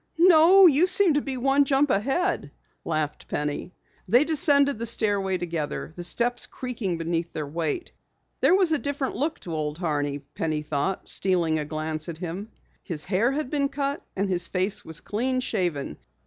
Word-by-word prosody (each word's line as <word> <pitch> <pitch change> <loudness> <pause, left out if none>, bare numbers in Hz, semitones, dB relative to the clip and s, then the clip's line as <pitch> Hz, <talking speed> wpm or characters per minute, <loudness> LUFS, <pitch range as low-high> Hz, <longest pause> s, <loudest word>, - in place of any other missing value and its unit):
"No, 350 +2 +7
you 330 +2 +5
seem 375 -3 +4
to 290 - +2
be 265 -2 -4
one 270 +3 +3
jump 275 0 +2
ahead," 270 - 0 0.3
laughed 155 -2 -3
Penny. 150 +4 -3 0.4
They 240 +9 +5
descended 285 -5 +3
the 230 - -2
stairway 200 -4 0
together, 165 -3 -4
the 175 - -6
steps 240 +6 0
creaking 230 -9 -4
beneath 165 0 -2
their 155 - -3
weight. 160 - -3 0.5
There 365 - +5
was 375 -4 +4
a 315 - +2
different 285 -1 -3
look 305 +4 -2
to 170 - -6
Old 150 -1 -3
Horney, 145 -5 -1
Penny 150 +2 -4
thought, 150 +5 -2
stealing 170 -4 +1
a 150 - -3
glance 155 +1 -3
at 165 - -6
him. 180 +5 -6 0.3
His 160 -6 -4
hair 210 +6 +1
had 290 -2 -3
been 280 -2 +1
cut 280 0 -3
and 200 +1 0
his 175 -2 +1
face 190 +2 -1
was 160 0 -8
clean 255 +5 -1
shaven. 175 - -2
195 Hz, 175 wpm, -25 LUFS, -, 0.5 s, No